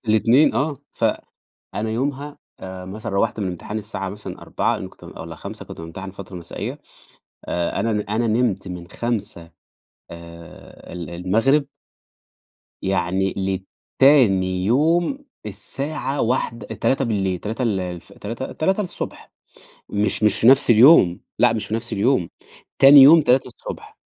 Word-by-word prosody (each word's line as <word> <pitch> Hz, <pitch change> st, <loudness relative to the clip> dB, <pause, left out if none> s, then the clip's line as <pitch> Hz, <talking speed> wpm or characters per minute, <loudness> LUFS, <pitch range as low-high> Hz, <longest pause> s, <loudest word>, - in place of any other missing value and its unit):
الاتنين 115 Hz, +7 st, +4 dB
آه، 145 Hz, +2 st, 0 dB, 0.2 s
ف -, -, -3 dB, 0.7 s
أنا 110 Hz, +2 st, -2 dB
يومها 140 Hz, +5 st, -3 dB, 0.2 s
آآ، 95 Hz, -1 st, -8 dB
مثلًا 100 Hz, +4 st, -7 dB
روّحت 105 Hz, +3 st, 0 dB
من 100 Hz, -, -2 dB
الامتحان 90 Hz, +4 st, -5 dB
الساعة 100 Hz, -2 st, -4 dB
مثلًا 105 Hz, +2 st, -8 dB
16:00 -, -, -1 dB
لإنّي -, -, -6 dB
كنت -, -, -16 dB
بام -, -, -12 dB
والَّا -, -, -8 dB
17:00 -, -, -9 dB
كنت -, -, -10 dB
بامتحن 95 Hz, +4 st, -8 dB
فترة 95 Hz, -1 st, -10 dB
مسائية، 85 Hz, -2 st, -6 dB, 0.7 s
آآ، 85 Hz, -1 st, -2 dB
أنا 115 Hz, -, 0 dB
د 105 Hz, -, 0 dB
أنا 115 Hz, +3 st, 0 dB
نِمت 110 Hz, -4 st, 0 dB
من 90 Hz, -1 st, -8 dB
17:00 105 Hz, -8 st, -4 dB, 0.6 s
آآ، 85 Hz, 0 st, -12 dB
ال 85 Hz, -3 st, -6 dB
المغرب 110 Hz, -, +1 dB, 1.2 s
يعني 95 Hz, 0 st, 0 dB, 0.6 s
لتاني 95 Hz, -10 st, +4 dB
يوم 165 Hz, -, +1 dB, 0.2 s
الساعة 135 Hz, +7 st, -4 dB
واحد 115 Hz, -1 st, 0 dB, 0.2 s
03:00 110 Hz, -7 st, 0 dB
03:00 110 Hz, +7 st, -4 dB
ال 105 Hz, -6 st, 0 dB
الف 90 Hz, -1 st, -7 dB
تلاتة 115 Hz, +5 st, -6 dB
3:00، 190 Hz, +3 st, -3 dB, 0.6 s
مش 105 Hz, +1 st, 0 dB
مش 105 Hz, -2 st, +3 dB
في 115 Hz, -, +3 dB
نفس 135 Hz, +1 st, +6 dB
اليوم، 110 Hz, -, +6 dB, 0.2 s
لأ 120 Hz, -2 st, +5 dB
مش 110 Hz, -, -2 dB
في -, -, -6 dB
نفس 115 Hz, +1 st, -3 dB
اليوم، 105 Hz, -3 st, +1 dB, 0.5 s
تاني 140 Hz, +1 st, +10 dB
يوم 155 Hz, +5 st, +9 dB
3:00 130 Hz, -4 st, -2 dB
110 Hz, 140 wpm, -21 LUFS, 95-130 Hz, 1.2 s, تاني